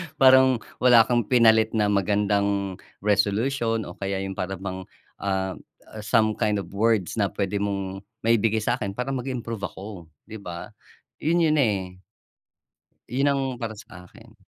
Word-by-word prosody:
Parang 130 Hz, -1 st, +6 dB, 0.2 s
wala 120 Hz, -3 st, +7 dB
kang 120 Hz, -2 st, 0 dB
pinalit 110 Hz, -3 st, +4 dB
na 105 Hz, -2 st, +2 dB
magandang 100 Hz, -1 st, 0 dB, 0.2 s
resolution 110 Hz, +3 st, +1 dB
o 85 Hz, -, -8 dB
kaya 95 Hz, -1 st, -2 dB
yung 95 Hz, -1 st, -6 dB
para 95 Hz, +1 st, -2 dB
bang, 95 Hz, 0 st, -6 dB, 0.3 s
ah, 95 Hz, -1 st, -2 dB, 0.4 s
some 110 Hz, +1 st, +2 dB
kind 105 Hz, 0 st, 0 dB
of 95 Hz, -4 st, -5 dB
words 110 Hz, -1 st, +1 dB
na 100 Hz, -, +3 dB
p'wede 100 Hz, +1 st, -2 dB
mong 100 Hz, -1 st, -4 dB, 0.2 s
maibigay 110 Hz, -1 st, +2 dB
sa'kin 105 Hz, -5 st, -2 dB
para 125 Hz, +2 st, -3 dB
mag-improve 120 Hz, -6 st, -4 dB
ako, 95 Hz, -2 st, -10 dB, 0.2 s
'di 110 Hz, -, -7 dB
ba? 90 Hz, +1 st, -8 dB, 0.5 s
Yun 170 Hz, +2 st, +2 dB
yun, 155 Hz, -1 st, +3 dB
eh. 95 Hz, -7 st, 0 dB, 1.1 s
Yun 135 Hz, +3 st, +1 dB
ang 140 Hz, -1 st, +1 dB, 0.2 s
para 110 Hz, -2 st, -4 dB
sa 90 Hz, -3 st, -12 dB
akin. 110 Hz, -1 st, -17 dB
105 Hz, 145 wpm, -25 LUFS, 100-115 Hz, 1.1 s, wala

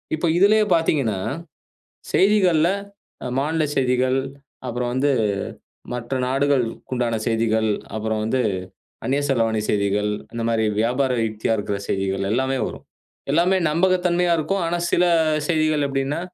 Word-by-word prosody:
இப்ப 160 Hz, -, -2 dB
இதுலயே 215 Hz, +3 st, +5 dB
பாத்தீங்கன்னா, 145 Hz, -, +1 dB, 1.0 s
செய்திகள்ல 185 Hz, -5 st, +4 dB, 0.7 s
மாநில 155 Hz, +3 st, 0 dB
செய்திகள், 130 Hz, 0 st, +2 dB, 0.5 s
அப்புறம் 120 Hz, 0 st, -2 dB
வந்து 135 Hz, +3 st, +1 dB, 0.8 s
மற்ற 125 Hz, +1 st, -4 dB
நாடுகளுக்குண்டான 130 Hz, -3 st, 0 dB
செய்திகள், 110 Hz, -1 st, +1 dB, 0.3 s
அப்புறம் 110 Hz, 0 st, -2 dB
வந்து 120 Hz, +4 st, 0 dB, 0.7 s
அந்நிய 140 Hz, +2 st, +1 dB
செலவாணி 115 Hz, -4 st, +1 dB
செய்திகள், 100 Hz, 0 st, +1 dB, 0.2 s
இந்த 115 Hz, 0 st, -3 dB
மாரி 115 Hz, -1 st, +1 dB, 0.2 s
வியாபார 125 Hz, +3 st, +1 dB, 0.2 s
யுக்தியா 110 Hz, +1 st, -1 dB
இருக்கிற 100 Hz, -1 st, -2 dB
செய்திகள் 95 Hz, 0 st, -1 dB
எல்லாமே 130 Hz, +3 st, 0 dB
வரும். -, -, -9 dB, 0.5 s
எல்லாமே 175 Hz, +5 st, +3 dB
நம்பகத்தன்மையா 180 Hz, +1 st, +2 dB
இருக்கும். 180 Hz, +5 st, -1 dB
ஆனா 170 Hz, +1 st, -1 dB
சில 180 Hz, -, +3 dB, 0.4 s
செய்திகள் 155 Hz, -3 st, +2 dB
எப்படின்னா 135 Hz, +3 st, -2 dB
130 Hz, 115 wpm, -22 LUFS, 115-160 Hz, 1.0 s, இதுலயே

